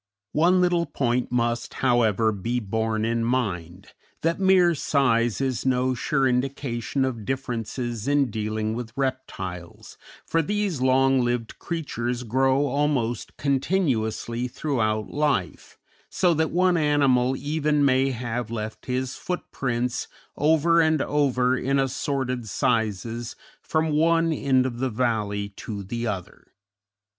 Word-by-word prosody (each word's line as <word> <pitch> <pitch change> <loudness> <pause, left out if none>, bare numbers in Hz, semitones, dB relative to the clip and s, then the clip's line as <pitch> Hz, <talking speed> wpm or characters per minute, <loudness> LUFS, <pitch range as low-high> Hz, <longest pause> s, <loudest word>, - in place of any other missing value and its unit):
One 175 +4 +4
little 175 -1 +2
point 125 -2 -1
must, 120 -1 -1
however, 115 -4 +2
be 115 +5 -2
borne 110 0 -1
in 115 0 0
mind, 100 -7 -2 0.3
that 165 +3 +1
mere 190 -3 +5
size 120 -7 +1
is 130 -3 -1
no 130 0 +1
sure 135 +2 +1
indication 130 0 -1
of 120 -5 -4
differences 120 -1 -3
in 140 -4 +2
dealing 110 0 -2
with 115 -1 -6
reptiles, 95 -10 -5 0.3
for 165 - +1
these 200 -4 -1
long 130 0 +4
lived 120 -1 -2
creatures 125 -7 -3
grow 130 +4 +2
almost 140 -4 -1
continuously 130 - 0
throughout 110 -6 -1
life, 145 -11 -1 0.3
so 180 -2 +2
that 160 0 +1
one 180 +1 +2
animal 135 -4 +3
even 150 -1 +1
may 135 0 +3
have 120 -2 -3
left 110 -1 -6
his 130 0 -2
footprints 125 -8 -3 0.3
over 160 +3 +4
and 160 -2 +2
over 130 -4 +2
in 135 +2 0
assorted 130 -3 -1
sizes 115 +2 -1 0.3
from 160 -1 0
one 165 +2 +3
end 130 -3 +2
of 120 -2 -4
the 130 0 0
valley 105 -4 -1
to 100 -3 -6
the 120 +4 -3
other. 95 -5 -6
130 Hz, 125 wpm, -25 LUFS, 115-145 Hz, 0.3 s, mere